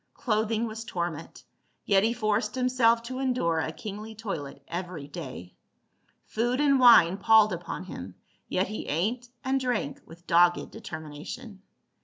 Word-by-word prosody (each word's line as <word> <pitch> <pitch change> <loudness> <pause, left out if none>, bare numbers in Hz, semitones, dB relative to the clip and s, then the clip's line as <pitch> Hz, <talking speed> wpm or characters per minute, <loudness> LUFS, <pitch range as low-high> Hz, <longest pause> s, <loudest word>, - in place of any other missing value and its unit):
Clothing 220 0 0
was 220 0 -6
torment, 170 -7 -5 0.4
yet 195 -1 +4
he 225 - +3
forced 215 -1 0
himself 250 -2 +3
to 255 +2 -5
endure 245 -12 +1
a 160 - -2
kingly 215 +5 -8
toilet 145 -11 -6
every 175 -4 -5
day. 130 -10 -8 0.7
Food 240 +4 -1
and 280 -2 +4
wine 195 -8 +7
palled 215 0 +5
upon 175 +1 -5
him, 95 - -8 0.3
yet 185 +2 +1
he 215 - -5
ate 230 +10 -1
and 265 +1 +1
drank 245 - -2
with 170 +2 -15
dogged 175 +1 +3
determination. 190 - -8
215 Hz, 140 wpm, -27 LUFS, 170-235 Hz, 0.7 s, wine